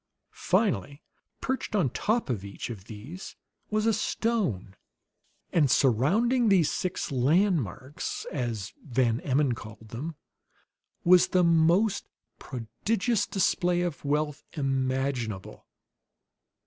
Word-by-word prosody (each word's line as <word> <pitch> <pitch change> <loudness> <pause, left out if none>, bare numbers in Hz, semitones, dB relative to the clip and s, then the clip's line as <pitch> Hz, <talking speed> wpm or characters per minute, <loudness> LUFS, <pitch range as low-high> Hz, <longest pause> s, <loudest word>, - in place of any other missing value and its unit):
Finally, 140 +9 0 0.4
perched 260 -4 -2
on 190 -6 +3
the - - -25
top 225 +3 0
of 105 -5 -3
each 100 +4 -6
of 100 -5 -9
these 125 - -9 0.3
was 215 0 0
a 225 - +4
stone; 200 - -1 0.8
and 150 -5 +4
surrounding 195 - +3
these 180 -6 +4
six 185 -4 -2
"landmarks," 140 - 0
'as 115 -7 -3
Van 120 -3 +1
Emmon 140 -1 +1
called 110 -1 -10
them, 150 +9 -5 0.9
was 180 0 +6
the 180 -1 +3
most 170 +5 +3 0.3
prodigious 195 - -1
display 180 -2 +1
of 175 -4 -3
wealth 150 0 0
imaginable. 130 - -2
145 Hz, 110 wpm, -28 LUFS, 120-185 Hz, 0.9 s, was